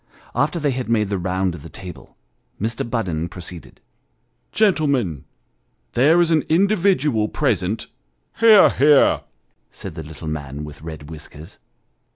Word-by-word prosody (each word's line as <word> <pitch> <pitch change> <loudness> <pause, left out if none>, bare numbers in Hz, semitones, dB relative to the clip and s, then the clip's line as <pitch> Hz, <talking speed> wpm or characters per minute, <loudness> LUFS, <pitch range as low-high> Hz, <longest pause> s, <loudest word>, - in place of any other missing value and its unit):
After 150 +7 0
they 145 -3 +1
had 125 -2 -4
made 105 -3 +1
the 100 -2 -1
round 90 0 -1
of 85 - -9
the - - -10
table, 90 -2 -11 0.4
Mr. 115 +2 -2
Budden 85 -9 -2
proceeded 90 -1 -9 0.4
" - - -47
Gentlemen; 140 - +1 0.7
there 155 +7 +4
is 170 -1 +3
an 160 -2 +4
individual 170 - +2
present 110 -7 -1 0.2
" - - -47
" - - -31
Hear! 220 -3 +7
hear! 145 0 +4 0.2
" - - -47
said 95 - -9
the 80 - -7
little 80 +1 -9
man 75 -2 -5
with 75 -1 -10
red 80 -1 -9
whiskers. 80 +3 -10
105 Hz, 155 wpm, -21 LUFS, -, 0.7 s, Hear